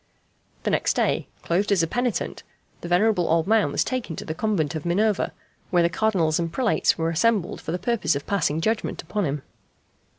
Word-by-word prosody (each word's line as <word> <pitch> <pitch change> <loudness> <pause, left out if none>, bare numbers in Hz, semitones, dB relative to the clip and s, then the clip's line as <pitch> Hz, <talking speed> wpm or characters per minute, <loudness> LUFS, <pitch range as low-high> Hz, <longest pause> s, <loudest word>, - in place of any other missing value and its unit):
The - - 0
next - - +1
day, - - +1 0.2
clothed 190 +5 0
as 190 -4 +4
a - - +1
penitent, 245 +5 -2 0.4
the - - -6
venerable 180 0 +3
old 165 0 +3
man 220 +1 +3
was - - +1
taken 250 -10 -3
to - - -7
the 155 - -3
Convent 170 -5 0
of 155 -2 -4
Minerva, 200 +4 +1 0.4
where 175 -2 +3
the 170 - +3
Cardinals 175 -5 +1
and 165 -1 -2
prelates 245 +3 +2
were 165 0 0
assembled 195 +2 +1
for - - -5
the 175 - -1
purpose 185 -6 0
of 140 - -4
passing 165 -5 0
judgment 220 +5 -1
upon 205 -3 -2
him. 140 -1 -3
175 Hz, 195 wpm, -24 LUFS, 165-215 Hz, 0.4 s, as